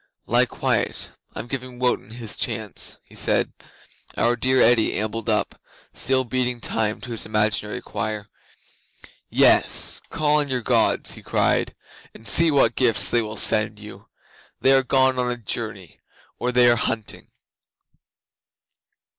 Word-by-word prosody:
'"Lie - - +2
quiet. - - -2 0.2
I'm - - -5
giving 125 -1 -6
Wotan 125 -3 -1
his 115 -1 -6
chance," - - -3
he - - -22
said. - - +1 0.6
Our 120 +1 +2
dear 130 +2 +1
Eddi 120 -2 +4
ambled 110 +1 -3
up, - - -1 0.3
still 130 0 +1
beating 125 0 -2
time 110 0 -2
to 125 - -8
his 115 - -5
imaginary 105 +2 -1
choir. 110 -3 -4 1.0
'"Yes. - - +2
Call 150 -2 +1
on 145 - 0
your 130 -2 -1
Gods," - - +2
he - - -7
cried, - - 0 0.4
"and 115 - -7
see 165 +10 +4
what 140 -3 +3
gifts 120 -3 +3
they 120 - +3
will 110 0 -5
send 105 -1 +2
you. 105 0 -13 0.5
They 135 - +4
are 135 0 +6
gone 130 0 +2
on 125 0 0
a 120 - -2
journey, 105 -5 -6 0.4
or 125 - -1
they 125 0 +5
are 120 0 +4
hunting." 110 -1 -3
120 Hz, 145 wpm, -22 LUFS, 110-130 Hz, 1.0 s, are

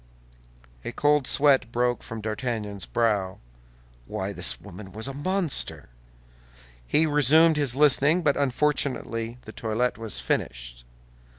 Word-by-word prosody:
A - - -4
cold 145 0 +2
sweat 135 -4 +3
broke 120 0 0
from 115 -1 -7
D'Artagnan's 105 -3 -4
brow. 105 -5 0 0.7
Why, - - -4
this 60 -1 -1
woman 95 +2 -11
was 110 +4 -5
a 135 - -5
monster! 170 - -1 1.0
He 155 - +3
resumed 155 +2 +4
his 140 -5 0
listening, 150 +4 +4
but 145 -3 +3
unfortunately 130 -4 -1
the 110 - -10
toilet 115 +2 -2
was 110 - -1
finished. - - -3
120 Hz, 120 wpm, -26 LUFS, 110-145 Hz, 1.0 s, resumed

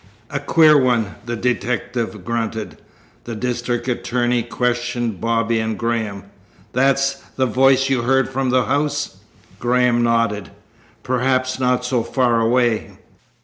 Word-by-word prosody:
"A 145 - -1
queer 155 +1 +5
one!" 120 -5 +1
the 120 - -2
detective 120 -3 -2
grunted. 115 -1 -3 0.5
The 115 - -5
district 120 +1 -2
attorney 120 -1 0
questioned 120 -2 -2
Bobby 115 0 +1
and 110 0 -2
Graham. 110 -4 -2 0.5
"That's 135 +1 +2
the 130 - +1
voice 135 +2 +3
you 135 -3 +1
heard 135 +2 +2
from 135 0 -2
the 125 0 +2
house?" 145 -6 -1 0.4
Graham 125 0 +2
nodded. 115 -3 +1 0.5
"Perhaps 130 0 0
not 125 -1 +1
so 125 -1 +1
far 120 -1 +1
away." 120 -1 +1
120 Hz, 125 wpm, -20 LUFS, 115-130 Hz, 0.5 s, queer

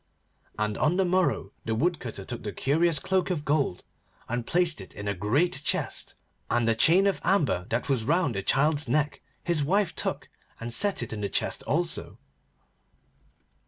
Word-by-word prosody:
And 105 0 -1
on 160 +4 +2
the 190 - +3
morrow 180 - +1
the 110 - -1
Woodcutter 125 - -2
took 120 - -5
the 105 - -4
curious 160 +6 +2
cloak 190 +4 0
of 160 -5 -2
gold 140 -11 0 0.4
and 120 0 -3
placed 170 - +1
it 95 - -11
in 100 - -6
a 100 - +1
great 130 - 0
chest, - - -2 0.3
and 120 -1 +1
a 115 - +4
chain 170 - +4
of 200 - +1
amber 150 - +1
that 115 +2 -1
was 135 -5 +1
round 160 +1 +1
the 100 - -2
child's 150 +8 +2
neck 150 0 0 0.2
his 170 -4 +1
wife 190 +4 +1
took - - -3 0.3
and 115 0 -3
set 200 - +3
it 115 - -5
in 105 - -5
the 100 - -1
chest - - -1
also. - - -1
145 Hz, 175 wpm, -27 LUFS, 115-175 Hz, 0.4 s, a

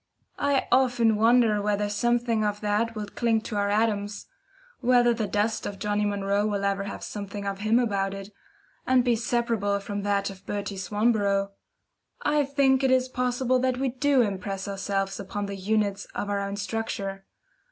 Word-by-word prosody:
I 285 -1 +1
often 245 -3 +3
wonder 225 -1 +4
whether 205 0 0
something 235 +1 +1
of 210 0 -1
that 215 +2 0
wilt 210 -1 -6
cling 230 -2 +1
to 220 - -6
our 200 0 +1
atoms 205 -1 0 0.5
whether 245 -1 +4
the 225 -2 -2
dust 210 +2 0
of 200 - -6
Johnnie 210 +1 0
Munro 200 0 0
will 200 -1 -1
ever 200 0 0
have 200 - -6
something 200 0 -6
of 195 -1 -3
him 215 +3 +2
about 200 -5 0
it, 195 +1 -8 0.6
and 255 -1 +4
be 240 -1 +2
separable 225 -3 0
from 205 0 -4
that 200 0 0
of 195 -1 -14
Bertie 200 -1 -3
Swanborough. 200 -1 +1 0.7
I 295 -1 +2
think 275 -1 +3
it 265 - +3
is 255 0 +3
possible 250 0 0
that 255 0 0
we 265 0 0
DO 260 +1 +3
impress 195 -1 -3
ourselves 195 0 -2
upon 200 +1 -4
the 200 0 -5
units 200 0 0
of 205 - -2
our 200 - 0
own 200 0 -3
structure. 200 -1 -4
210 Hz, 175 wpm, -26 LUFS, 200-240 Hz, 0.7 s, wonder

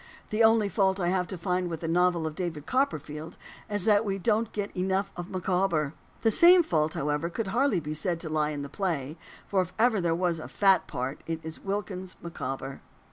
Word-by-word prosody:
The 215 +2 +3
only 220 -1 +5
fault 195 -1 +1
I 175 -2 +1
have 180 -1 +1
to 190 - -6
find 180 +1 -1
with 165 -2 -5
the 165 - -3
novel 175 0 +2
of 155 - -3
David 160 -3 -4
Copperfield 155 - -2 0.3
is 205 -2 +2
that 210 -1 +5
we 195 -2 -1
don't 220 +3 +1
get 205 -1 -4
enough 190 +2 0
of 175 +1 -6
Micawber. 180 -5 0 0.3
The 225 - +4
same 350 - +7
fault, 155 - 0
however, 150 +3 -1
could 200 +3 -3
hardly 235 -2 +2
be 155 -1 -5
said 170 +2 -1
to 165 - -5
lie 155 -1 +1
in 145 -2 -4
the - - -5
play; 155 -5 -2 0.3
for 195 -2 +1
if 180 0 -5
ever 225 -3 +3
there 170 -1 +1
was 175 -2 0
a - - -7
"fat" 195 -2 +3
part, 130 +3 -4
it 165 -1 -2
is 160 0 -7
Wilkins 190 -2 -4
Micawber. 135 -5 -5
180 Hz, 210 wpm, -28 LUFS, 160-200 Hz, 0.3 s, same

